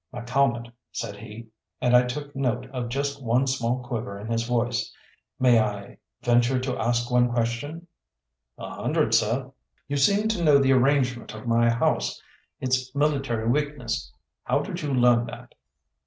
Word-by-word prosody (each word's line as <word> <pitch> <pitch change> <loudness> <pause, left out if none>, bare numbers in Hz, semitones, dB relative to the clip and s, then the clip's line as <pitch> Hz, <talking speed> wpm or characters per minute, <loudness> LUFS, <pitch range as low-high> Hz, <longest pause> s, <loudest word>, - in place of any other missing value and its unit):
"McCalmont," 120 -1 0 0.2
said 115 -4 -5
he, 115 +2 -10 0.3
and 125 0 +3
I 125 0 +6
took 145 +3 -6
note 125 -2 -1
of 125 -3 -4
just 140 +2 -2
one 120 +3 +2
small 125 -1 -1
quiver 115 -4 -4
in 105 +3 -8
his 115 0 0
voice, 120 -1 0 0.5
"may 125 -3 +5
I 100 -2 -3 0.2
venture 120 +2 +3
to 130 0 -2
ask 120 +1 0
one 125 0 +4
question?" 120 +8 -2 0.7
"A - - -7
hundred, - - +1
seh." 115 +5 +2 0.4
"You 145 - -1
seem 200 +10 +3
to 185 -6 -1
know 150 -3 +6
the 135 -1 +4
arrangement 125 -3 +1
of 110 - -9
my 115 0 +3
house 115 0 0 0.4
its 130 0 -1
military 135 -6 0
weakness. 125 -3 -1 0.3
How - - +1
did - - -5
you 145 -2 -2
learn 120 -2 +4
that?" 120 - -10
125 Hz, 155 wpm, -25 LUFS, 115-135 Hz, 0.7 s, I